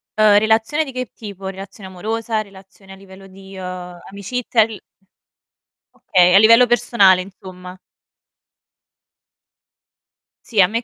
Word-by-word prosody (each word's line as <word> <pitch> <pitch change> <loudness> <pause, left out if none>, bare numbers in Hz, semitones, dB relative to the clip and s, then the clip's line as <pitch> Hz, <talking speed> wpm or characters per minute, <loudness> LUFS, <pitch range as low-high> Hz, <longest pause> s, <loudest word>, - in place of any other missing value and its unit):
Uhm, 215 -1 +4
relazione 220 +8 +1
di 270 - -9
che 255 -1 -5
tipo, 200 -3 -10
relazione 195 0 -10
amorosa, 220 +4 -4
relazione 195 -1 -17
a - - -12
livello 195 0 -16
di, 195 0 -14
uhm, 180 -1 -8
amicizia? 225 +3 -2
Il 215 -3 -3 1.1
Okay, 180 -1 +2
a - - +8
livello 230 +3 +6
personale 200 -6 +3
insomma. 185 -1 -12 2.7
Sì, 220 -4 -3
a 185 - +6
me 230 +4 -3
è - - -12
195 Hz, 125 wpm, -18 LUFS, 190-220 Hz, 2.7 s, a